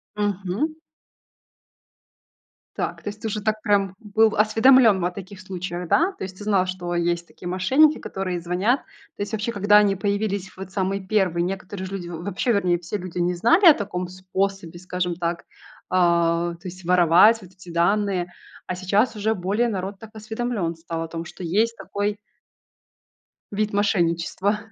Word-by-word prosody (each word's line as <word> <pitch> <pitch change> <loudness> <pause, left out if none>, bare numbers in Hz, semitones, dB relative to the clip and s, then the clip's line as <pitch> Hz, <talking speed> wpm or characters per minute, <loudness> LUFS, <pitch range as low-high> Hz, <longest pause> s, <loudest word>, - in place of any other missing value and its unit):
Мгм. 205 - -1 2.0
Так, - - -4
то - - -3
есть 210 +1 -10
ты 225 - -3
уже 210 0 -3
так 215 +1 -1
прям 200 -3 +1
был 220 0 +2
осведомлен 220 -1 +5
о 180 - 0
таких 190 +1 -10
случаях, 180 -2 -5
да? 340 - +3
То - - -8
есть 185 0 -7
ты - - -7
знал, 200 -3 +2
что 180 -1 -4
есть 170 0 0
такие 175 - -10
мошенники, 260 - +3
которые 185 -2 -4
звонят? 185 +10 +1 0.4
То - - -8
есть, 205 +1 -3
вообще, 220 +1 -2
когда 205 -1 +4
они 205 -2 +4
появились 200 -1 -2
вот 190 0 -8
самые 195 0 -1
1, 185 -4 +1
некоторые 190 +1 -4
же 190 - -8
люди, 185 -3 -5
в 170 -1 -7
вообще, 200 +5 -1
вернее, 180 -5 +2
все 180 +4 -4
люди 180 -2 -6
не 175 +1 +1
знали 330 - +4
о 325 - +11
таком 185 -4 -4
способе, 185 -1 -3
скажем 180 -1 -3
так, 170 0 -3 0.4
а, 170 -1 +2
то 175 +3 -11
есть 180 +1 -9
воровать 180 +5 +5
вот 185 - -14
эти 185 -1 -15
данные. 180 +1 +1 0.3
А 185 - -3
сейчас 200 +7 +1
уже 215 +1 0
более 200 +6 0
народ 195 -1 -4
так 225 - -11
осведомлен 220 -5 -3
стал 165 0 -5
о - - -5
том, 165 +1 -6
что 180 - -10
есть 220 +7 +1
такой 205 +1 -3 1.3
вид 210 +1 -1
мошенничества. 195 0 +1
190 Hz, 170 wpm, -23 LUFS, 175-210 Hz, 2.0 s, о